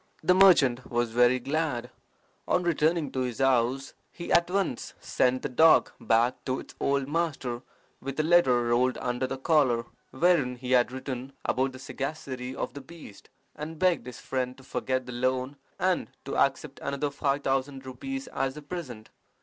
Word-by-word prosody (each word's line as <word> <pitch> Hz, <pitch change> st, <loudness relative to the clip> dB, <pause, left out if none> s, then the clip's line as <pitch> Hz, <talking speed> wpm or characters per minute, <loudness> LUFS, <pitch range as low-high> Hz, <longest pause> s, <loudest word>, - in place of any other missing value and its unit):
"The 180 Hz, -, +5 dB
merchant 155 Hz, -10 st, +5 dB
was 120 Hz, -1 st, 0 dB
very 125 Hz, +2 st, +4 dB
glad. 145 Hz, -2 st, -2 dB, 0.6 s
On 180 Hz, -, +2 dB
returning 160 Hz, -3 st, +1 dB
to 130 Hz, -, -3 dB
his 125 Hz, -3 st, -2 dB
house, 135 Hz, 0 st, +1 dB, 0.2 s
he 170 Hz, -, -7 dB
at 170 Hz, 0 st, +4 dB
once 190 Hz, -9 st, -2 dB
sent 130 Hz, 0 st, +1 dB
the -, -, 0 dB
dog 160 Hz, +5 st, +5 dB
back 115 Hz, +2 st, +2 dB
to 130 Hz, -1 st, -1 dB
its -, -, -11 dB
old 140 Hz, -1 st, +1 dB
master 145 Hz, -6 st, -2 dB, 0.4 s
with 135 Hz, +2 st, -5 dB
a -, -, +3 dB
letter 155 Hz, -8 st, +4 dB
rolled 120 Hz, +2 st, +2 dB
under 125 Hz, +1 st, -2 dB
the 135 Hz, -, -4 dB
collar, 130 Hz, -5 st, +2 dB, 0.2 s
wherein 150 Hz, -4 st, +2 dB
he 125 Hz, +1 st, -6 dB
had 125 Hz, -1 st, +4 dB
written 130 Hz, 0 st, -6 dB
about 130 Hz, +1 st, 0 dB
the -, -, -9 dB
sagacity 130 Hz, -1 st, -5 dB
of -, -, -4 dB
the 140 Hz, -, -8 dB
beast, 140 Hz, -7 st, -13 dB, 0.3 s
and 155 Hz, +2 st, -7 dB
begged 175 Hz, -8 st, +1 dB
his 125 Hz, -, -8 dB
friend 130 Hz, -1 st, -3 dB
to 135 Hz, -, -15 dB
forget 130 Hz, -1 st, -2 dB
the 125 Hz, -, -7 dB
loan 130 Hz, +3 st, -1 dB, 0.2 s
and 185 Hz, -1 st, 0 dB, 0.2 s
to 135 Hz, -, -4 dB
accept 140 Hz, +1 st, 0 dB
another 140 Hz, +1 st, -2 dB
five 140 Hz, 0 st, -1 dB
thousand 135 Hz, 0 st, -1 dB
rupees 270 Hz, -, -5 dB
as 135 Hz, +1 st, -2 dB
a 150 Hz, -, -8 dB
present. 140 Hz, -9 st, -7 dB
135 Hz, 175 wpm, -28 LUFS, 125-155 Hz, 0.6 s, The